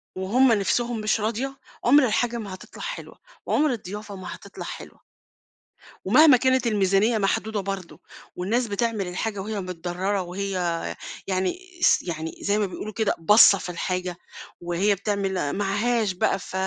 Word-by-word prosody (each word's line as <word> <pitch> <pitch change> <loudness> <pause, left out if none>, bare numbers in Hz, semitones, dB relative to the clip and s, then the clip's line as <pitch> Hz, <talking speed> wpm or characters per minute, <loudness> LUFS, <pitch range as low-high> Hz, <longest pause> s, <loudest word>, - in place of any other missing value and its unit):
وهم 235 +8 +3
نفسهم 230 +2 +1
مش 215 +1 +1
راضية، 240 +5 -2 0.3
عمر 270 +2 +6
الحاجة 235 +1 0
ما 205 -4 -6
هتطلع 185 - -11
حلوة، - - -7 0.3
وعمر 300 -1 +2
الضيافة 205 -2 -6
ما 185 -2 -7
هتطلع - - -10
حلوة. - - -9 1.0
ومهما 305 -4 +7
كانت 260 -1 +2
الميزانيّة 205 +1 +2
محدودة 210 +1 0
برضه، 195 -2 -6 0.4
والناس 230 +7 0
بتعمل 210 -2 -1
الحاجة 200 +3 -3
وهي 210 0 -4
متضرّرة 180 +2 -2
وهي، 190 +3 -4 0.8
يعني 190 - -1 0.2
س - - +5
يعني 160 -2 -4
زي 205 +1 +1
ما 210 - +2
بيقولوا 205 +2 -6
كده 220 -1 0
باصّة 205 +3 +7
في 180 - -7
الحاجة، 180 0 -3 0.4
وهي 175 +4 +1
بتعمل 195 -6 -1
معهاش 205 +2 +1
بقى 190 +2 +1
ف - - -11
205 Hz, 145 wpm, -24 LUFS, 185-230 Hz, 1.0 s, ومهما